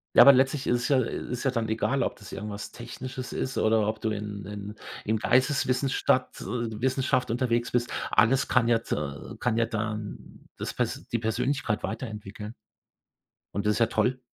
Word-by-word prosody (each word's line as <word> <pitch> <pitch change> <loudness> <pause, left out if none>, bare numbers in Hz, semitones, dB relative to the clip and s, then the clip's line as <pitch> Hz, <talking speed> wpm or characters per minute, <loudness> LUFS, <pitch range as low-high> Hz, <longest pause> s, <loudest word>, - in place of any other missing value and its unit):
Ja, - - +10
aber 140 - +10
letztlich 135 +2 +2
ist 120 0 +2
es - - 0
ja, 135 - +5
äh 115 - -2
ist 125 - -3
ja 135 - +2
dann 115 -3 -1
egal, 125 +5 +1
ob - - -2
das 105 - -12
irgendwas 105 -1 -6
Technisches 125 +2 -7
ist 130 - -2
oder 110 -1 +3
ob 110 0 -2
du 110 - 0
in 105 -1 -5
in 105 +1 -7 0.3
in 110 +1 +1
Geisteswissenstadt 130 +1 +2
äh, 115 -2 -3
Wissenschaft 130 -1 +1
unterwegs 120 0 0
bist. 120 -1 0 0.2
Alles 115 +7 +4
kann 120 -2 +3
ja 115 -1 +4
t - - -3
äh, 70 -1 -5
kann 115 -2 +1
ja 115 - +3
dann 110 -2 -5
das - - -4
pers - - -2
die 115 - 0
Persönlichkeit 120 0 0
weiterentwickeln. 105 -1 -5 1.0
Und 100 +2 -2
das 105 - +2
ja 115 - +5
toll. 125 +4 +1
115 Hz, 185 wpm, -27 LUFS, 105-125 Hz, 1.0 s, Ja